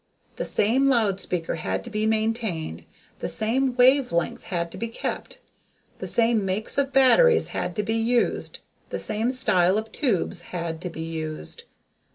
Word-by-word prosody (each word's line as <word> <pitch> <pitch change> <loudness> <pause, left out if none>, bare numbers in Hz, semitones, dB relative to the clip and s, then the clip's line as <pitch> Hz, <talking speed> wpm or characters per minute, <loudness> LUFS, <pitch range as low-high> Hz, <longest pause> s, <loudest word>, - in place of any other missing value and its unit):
The - - -2
same 245 +7 +2
loud 220 -8 +2
speaker 175 -4 -2
had 155 - -3
to 240 - -9
be 215 0 0
maintained, 220 - -2 0.3
the - - -3
same 245 +4 +1
wave 260 +1 +4
length 170 0 -2
had 170 -2 -3
to - - -8
be 230 - -2
kept, 230 - -5 0.6
the - - -5
same 230 -2 +2
makes 195 +7 -1
of 275 -1 0
batteries 275 - +5
had 180 - -3
to 210 - -1
be 220 +2 -1
used, 235 +1 0 0.3
the - - -3
same 220 +3 0
style 190 -7 +3
of 220 +1 -4
tubes 195 - 0
had 170 -2 -5
to 180 - -4
be 160 - -6
used. 160 - -5
220 Hz, 170 wpm, -25 LUFS, 175-245 Hz, 0.6 s, batteries